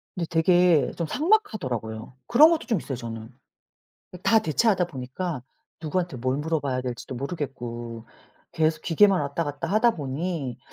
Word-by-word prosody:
근데 175 -3 -2
되게 175 -1 +4
좀 170 -2 -2
삭막하더라고요. 130 - -1
그런 300 +7 +7
것도 330 -5 0
좀 225 -7 +1
있어요, 135 - -5
저는. 115 -1 -7 0.9
다 225 - +5
대체하다 190 +1 +2
보니까 135 +1 -5 0.4
누구한테 170 0 -2
뭘 130 +2 -1
물어봐야 145 -4 -1
될지도 125 +1 -6
모르겠고 120 -5 -5 0.5
계속 155 0 +1
기계만 195 +3 +4
왔다 145 +3 -2
갔다 145 -1 -4
하다 215 +4 +4
보니 140 -2 -3
155 Hz, 330 characters per minute, -25 LUFS, 130-180 Hz, 0.9 s, 그런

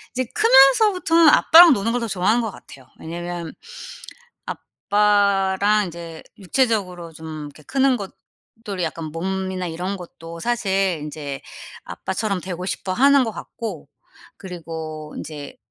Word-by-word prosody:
이제 255 +1 0
크면서부터는 325 - +5
아빠랑 335 +3 +8
노는 225 +1 -1
걸 245 - -1
더 230 - -2
좋아하는 210 +4 +1
것 225 - -2
같아요. 130 -7 -15
왜냐하면 170 0 -6 0.9
아빠랑 205 0 +1
이제 165 -1 -9 0.2
육체적으로 190 -6 -1
좀 155 -1 -8
이렇게 145 +1 -14
크는 265 - +2
것들이 200 -1 -8
약간 160 0 -5
몸이나 185 +3 -3
이런 180 +4 -4
것도 170 -2 -10
사실 195 -6 0
인제 145 -2 -6 0.4
아빠처럼 195 0 -3
되고 180 0 -6
싶어하는 260 +9 +2
것 225 - -4
같고 200 - -7 0.5
그리고 160 -4 -7
인제 150 -2 -8
190 Hz, 295 characters per minute, -21 LUFS, 165-225 Hz, 0.9 s, 아빠랑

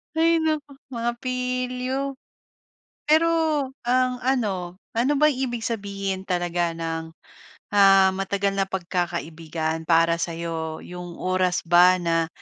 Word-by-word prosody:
Hay 330 +1 +4
naku, 310 -2 -1 0.2
mga 240 -2 -2
pilyo. 255 +2 -2 0.9
Pero 315 +2 +5 0.5
ang 250 +1 +1
ano, 195 -9 -1 0.2
ano 250 +5 +2
ba 300 - +6
ibig 250 -3 -3
sabihin 195 -3 -3
talaga 175 -1 0
ng, 165 0 -4 0.6
ah, 195 -1 +6
matagal 195 +1 -1
na 195 - +1
pagkakaibigan 165 -3 -3
para 165 0 +4
sa'yo, 165 -1 -4
'yong 175 -1 -8
oras 185 -1 +1
ba 175 +2 +6
na, 165 -1 +1
190 Hz, 110 wpm, -24 LUFS, 170-250 Hz, 0.9 s, ba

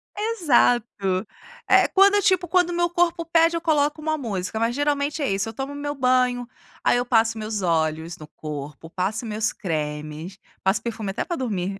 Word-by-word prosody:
Exato. 240 - +1 0.4
É - - +5
quando, 400 +1 +5
tipo, 365 -1 +2
quando 355 0 +3
o - - -3
meu 345 0 +1
corpo 345 -1 +1
pede, 330 0 +3
eu - - -5
coloco 300 -1 +1
uma 310 0 -1
música, 215 -5 -3
mas 230 +1 0
geralmente 290 +1 0
é 280 - 0
isso, 195 +3 -1
eu - - -8
tomo 270 +1 -5
o - - -8
meu 290 0 -4
banho, 250 -2 +2 0.4
aí - - +4
eu 245 - 0
passo 225 -2 +2
meus 215 -1 -3
óleos 160 -1 0
no 155 - -11
corpo, 150 0 -8
passo 195 +7 -2
meus 215 0 -1
cremes, 155 0 -4 0.3
passo 190 +2 +2
perfume 220 -4 -4
até 195 - -3
para 345 - -3
dormir. 195 -6 -3
240 Hz, 190 wpm, -23 LUFS, 190-310 Hz, 0.4 s, É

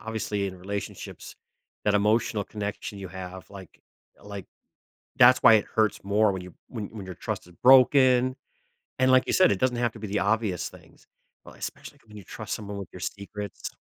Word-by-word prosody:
obviously 105 -3 -3
in 95 -1 -7
relationships, 100 +2 -7 0.5
that 105 - +2
emotional 105 0 +2
connection 105 -1 -5
you 95 - -7
have, 95 -1 -9
like 95 -3 -12 0.4
like, 100 -2 -8 0.7
that's 125 +1 +7
why 115 - +9
it 105 - +2
hurts 110 -3 +1
more 105 +1 +3
when 95 - -4
you 90 -1 -11 0.2
when 110 -5 -5
when 105 -4 -9
your 90 -2 -8
trust - - -5
is 90 - -17
broken, 130 0 +6 0.6
and 130 0 +4
like 130 0 +4
you - - 0
said, 185 - +5
it 95 - 0
doesn't 125 -2 +1
have 120 -2 0
to 110 - -11
be 105 - -5
the 105 +2 -1
obvious 100 -1 0
things, - - -18 0.4
well, - - -13
especially - - -8
when 105 0 -12
you 100 - -10
trust 110 +2 -6
someone 105 -2 -6
with 100 -3 -7
your 90 - -9
secrets. 100 0 -6
105 Hz, 190 wpm, -26 LUFS, 100-115 Hz, 0.7 s, why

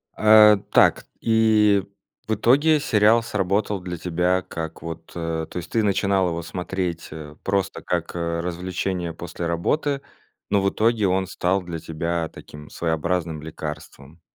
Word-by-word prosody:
А, 105 -1 +7
так, - - +4 0.2
и 110 -3 +4 0.4
в 110 - +1
итоге, 145 +8 +4
сериал 115 -3 +3
сработал 100 -1 -1
для 90 -1 -6
тебя 90 +2 0
как 80 -2 -7
вот, 80 0 -8
а 80 -1 -2
то - - -9
есть 90 - -6
ты 115 - +2
начинал 100 -1 +2
его 85 0 -3
смотреть, 90 +1 -4
а 75 -1 -9
просто 100 -1 -1
как 85 -1 -2
развлечение 85 +1 -3
после 85 +1 -6
работы, 135 - 0 0.5
но 100 - +3
в 100 - +2
итоге, 110 0 +1
он 95 +1 +1
стал 95 +1 0
для 85 -2 -6
тебя 85 +1 -3
таким 75 0 -12
своеобразным 80 -1 -2
лекарством. 80 0 -8
90 Hz, 140 wpm, -23 LUFS, 85-105 Hz, 0.5 s, А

